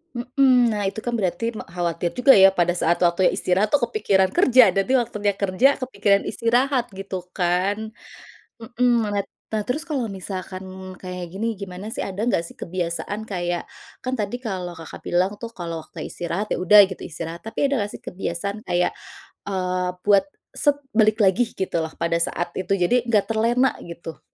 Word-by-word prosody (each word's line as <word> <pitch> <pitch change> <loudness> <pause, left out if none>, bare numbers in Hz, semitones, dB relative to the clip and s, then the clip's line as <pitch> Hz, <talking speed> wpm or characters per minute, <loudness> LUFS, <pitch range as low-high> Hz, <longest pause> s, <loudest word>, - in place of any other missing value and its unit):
Mhm. 250 0 +3
Nah, 205 - -2
itu 220 - -6
kan 240 +2 -3
berarti 230 +3 -1
me - - -6
khawatir 170 0 -2
juga 270 +2 +7
ya 195 0 +8
pada 175 -1 +1
saat 175 -1 +1
waktunya 175 +1 +3
istirahat 195 +4 +1
tuh 290 - +4
kepikiran 195 - +2
kerja, 255 - +6
nanti 195 +6 +1
waktunya 210 -3 -1
kerja 200 +9 +2
kepikiran 200 -6 +1
istirahat 245 +2 +1
gitu 190 -2 -6
kan. 195 +5 -1 0.6
Mhm, 240 0 +1
malat 205 -1 -2 0.2
nah, 215 -1 -1
terus 285 +6 -1
kalau 275 -6 -1
misalkan 190 -1 -7
kayak 180 -1 -5
gini, 225 0 -2
gimana 195 +1 -7
sih - - -6
ada 195 +1 -5
enggak 170 -8 +1
sih - - -13
kebiasaan 185 +4 -4
kayak 175 -3 -2 0.3
kan 255 0 -4
tadi 215 +1 -2
kalau, 185 -7 -4
Kakak, 165 -1 -10
bilang 180 +3 +1
tuh 230 - -5
kalau 170 -5 -5
waktu - - -8
istirahat 175 +5 -3
ya - - -1
udah 200 +2 +8
gitu 190 - -9
istirahat, 165 +1 -6
tapi 225 +5 -1
ada 275 -5 0
enggak 205 - -5
sih - - -31
kebiasaan 195 +3 -4
kayak, 175 -4 0 0.5
eee, 185 -2 -1
buat 200 -1 +4 0.3
set 290 -1 +2 0.2
balik 215 0 +4
lagi 200 +5 +4
gitu 190 - -2
loh 160 - -7
pada 170 0 +1
saat 170 0 -2
itu, 190 +1 -2
jadi 230 +7 +2
enggak 215 -4 +2
terlena 235 +4 +2
gitu? 170 -2 -9
200 Hz, 175 wpm, -23 LUFS, 180-230 Hz, 0.6 s, ya